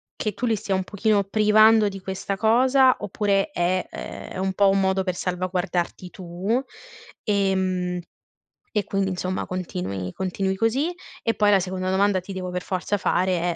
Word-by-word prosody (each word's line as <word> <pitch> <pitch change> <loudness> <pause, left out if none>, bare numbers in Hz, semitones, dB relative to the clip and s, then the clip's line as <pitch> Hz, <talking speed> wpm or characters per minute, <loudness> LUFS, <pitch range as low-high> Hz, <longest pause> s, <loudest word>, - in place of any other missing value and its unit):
che 215 - -2
tu 245 - -2
li 225 - +2
stia 205 -1 -3
un 190 0 +1
pochino 205 +1 +1
privando 215 +1 +5
di 195 -1 -8
questa 190 +1 -4
cosa. 255 +4 +4
Oppure 200 +4 0
è 180 -4 0
ehm, - - -8
è - - -7
un 190 0 -1
po' 200 +1 +4
un 195 0 +3
modo 190 0 +1
per 185 -1 -1
salvaguardarti 180 0 -2
tu, 185 +6 -2 0.6
ehm, 190 -3 0 0.8
e 210 - +2
quindi 195 -1 -1
insomma 185 0 -3
continui 95 - -4
continui 190 +1 -2
così 240 - +1 0.3
e 230 - +1
poi 210 -1 +3
la 200 -2 +5
seconda 185 0 -3
domanda, 195 0 +2
ti 190 +2 -8
devo 185 -1 -4
per 180 0 -2
forza 190 +2 -2
fare 180 -2 +1
190 Hz, 170 wpm, -24 LUFS, 185-210 Hz, 0.8 s, privando